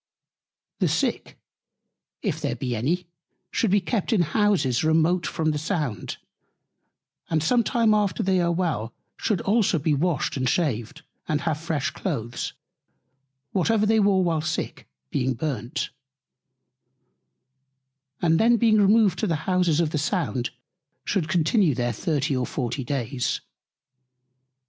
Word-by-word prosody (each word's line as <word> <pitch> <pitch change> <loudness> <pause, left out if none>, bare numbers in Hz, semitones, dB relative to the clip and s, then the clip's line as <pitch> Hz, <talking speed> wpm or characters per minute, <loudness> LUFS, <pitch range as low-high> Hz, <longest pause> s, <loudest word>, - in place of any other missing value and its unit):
The - - +2
Sick, - - -1 0.9
if - - -2
there - - -1
be 125 -2 -3
any, 165 +11 -1 0.5
should 225 - +1
be 205 +2 +4
kept 210 +4 -1
in 215 -6 +3
Houses 165 - +1
remote 160 +2 +2
from 155 -1 0
the 150 - -2
Sound; 150 - -3 1.1
and 155 -2 +1
some 235 +8 +3
time 225 -1 +2
after 205 -6 +1
they 185 -1 +2
are 170 0 +1
well, 155 -11 -2 0.2
should 205 -6 -1
also 205 -4 +2
be 150 +1 +1
washed 155 0 0
and 130 -1 +1
shaved, 145 -1 -1 0.2
and 150 -1 0
have 160 -3 -1
fresh 160 -4 -2
Cloaths; 115 +2 -4 1.0
whatever 210 +3 +2
they 220 +1 +3
wore 200 -2 +3
while 165 -3 +1
Sick 155 +2 -4 0.2
being 130 -1 0
burnt: 135 +1 -3 2.3
And 165 -1 +4
then 235 +1 +5
being 220 -1 +4
removed 200 -2 +4
to - - 0
the 155 -2 -2
Houses 180 -4 +2
of 165 -3 +1
the 150 - -1
Sound, 145 - -1 0.6
should 175 -6 -1
continue 170 - +3
there 120 -1 -1
30 145 +4 -1
or 125 -1 -1
40 130 0 -3
days. 125 -1 -2
160 Hz, 135 wpm, -25 LUFS, 140-190 Hz, 2.3 s, then